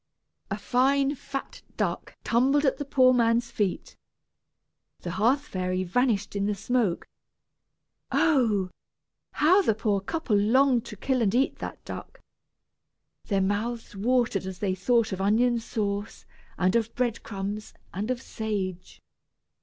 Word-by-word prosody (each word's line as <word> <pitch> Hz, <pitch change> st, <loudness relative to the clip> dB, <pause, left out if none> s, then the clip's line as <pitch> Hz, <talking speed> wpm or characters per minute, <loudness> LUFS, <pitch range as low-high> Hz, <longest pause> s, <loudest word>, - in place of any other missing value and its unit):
A 200 Hz, -, -2 dB
fine 270 Hz, +6 st, +2 dB
fat 275 Hz, 0 st, -7 dB, 0.2 s
duck -, -, -2 dB
tumbled 270 Hz, +5 st, +3 dB
at 265 Hz, -, +2 dB
the 290 Hz, -, -3 dB
poor 260 Hz, -2 st, +5 dB
man's 235 Hz, 0 st, +2 dB
feet. 200 Hz, -4 st, -2 dB, 1.1 s
The 175 Hz, -, -4 dB
hearth 240 Hz, +10 st, +2 dB
fairy 185 Hz, -3 st, -2 dB
vanished 205 Hz, +1 st, 0 dB
in 200 Hz, 0 st, 0 dB
the 210 Hz, -, 0 dB
smoke. 215 Hz, -3 st, 0 dB, 1.0 s
Oh! 225 Hz, -, +2 dB, 0.6 s
how 360 Hz, +7 st, +5 dB
the 225 Hz, -, +1 dB
poor 205 Hz, -2 st, 0 dB
couple 255 Hz, +1 st, -1 dB
longed 245 Hz, +4 st, +3 dB
to 210 Hz, -, -9 dB
kill 260 Hz, +4 st, 0 dB
and 210 Hz, -1 st, +2 dB
eat 265 Hz, +2 st, +2 dB
that -, -, -7 dB
duck. -, -, -8 dB, 1.1 s
Their 195 Hz, -2 st, +1 dB
mouths 210 Hz, +4 st, -2 dB
watered 225 Hz, -3 st, +1 dB
as 190 Hz, -1 st, -6 dB
they 190 Hz, 0 st, -1 dB
thought 230 Hz, +4 st, +1 dB
of 190 Hz, 0 st, -3 dB
onion 235 Hz, +4 st, +3 dB
sauce, 205 Hz, -2 st, -3 dB, 0.3 s
and 185 Hz, +3 st, +2 dB
of 230 Hz, -1 st, 0 dB
breadcrumbs, 215 Hz, -4 st, -3 dB, 0.2 s
and 200 Hz, +6 st, -3 dB
of 255 Hz, 0 st, -2 dB
sage. 195 Hz, -5 st, -4 dB
225 Hz, 135 wpm, -27 LUFS, 200-255 Hz, 1.1 s, poor